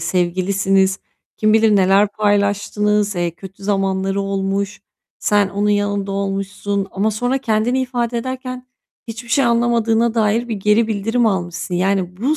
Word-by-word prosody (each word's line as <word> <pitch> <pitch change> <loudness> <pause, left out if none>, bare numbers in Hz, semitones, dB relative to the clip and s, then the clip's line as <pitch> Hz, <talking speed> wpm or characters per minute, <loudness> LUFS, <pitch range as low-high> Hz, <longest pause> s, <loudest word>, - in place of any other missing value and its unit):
sevgilisiniz. 190 +2 +1 0.4
Kim 215 0 +2
bilir 220 -1 +4
neler 195 +2 +4
paylaştınız. 205 0 +1
Eee, 175 -1 0
kötü 190 +3 -13
zamanları 195 -1 0
olmuş. 195 +1 -2 0.4
Sen 205 -2 +2
onun 205 +1 -1
yanında 205 -1 0
olmuşsun 195 0 -2
ama 205 +3 0
sonra 245 +5 -1
kendini 240 +1 0
ifade 240 -2 -2
ederken 255 0 -6 0.4
hiçbir 230 +1 -7
şey 275 +3 +2
anlamadığına 235 -1 +2
dair 225 +2 +1
bir 225 - -2
geri 210 +3 +2
bildirim 225 +3 0
almışsın 180 -3 -2
yani 185 0 0
bu 270 +10 0
205 Hz, 135 wpm, -19 LUFS, 195-230 Hz, 0.4 s, bilir